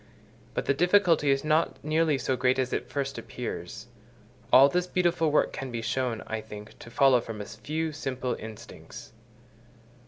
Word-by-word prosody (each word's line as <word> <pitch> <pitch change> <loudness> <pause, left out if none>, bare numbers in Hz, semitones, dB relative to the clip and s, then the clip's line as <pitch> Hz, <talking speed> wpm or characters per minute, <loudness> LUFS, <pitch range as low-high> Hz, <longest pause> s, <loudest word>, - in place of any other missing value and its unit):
But - - -2
the - - +2
difficulty 175 -2 +3
is 135 +1 +2
not 155 +2 +1
nearly 155 -1 +2
so 130 0 -1
great 125 +1 +2
as 130 -1 -1
at - - -3
first 135 -1 -3
appears: 110 -2 -6 0.7
all 135 +2 +8
this 180 +5 0
beautiful 175 -3 +1
work 150 - +2
can 135 - -5
be 115 -1 -4
shown, 125 -3 -2
I 110 0 -4
think, 105 -1 -11
to - - -11
follow 125 +1 +4
from 115 -2 -7
a 105 - -5
few 155 +10 -4
simple 130 -4 -3
instincts. 110 0 -11
135 Hz, 165 wpm, -27 LUFS, 115-155 Hz, 0.7 s, all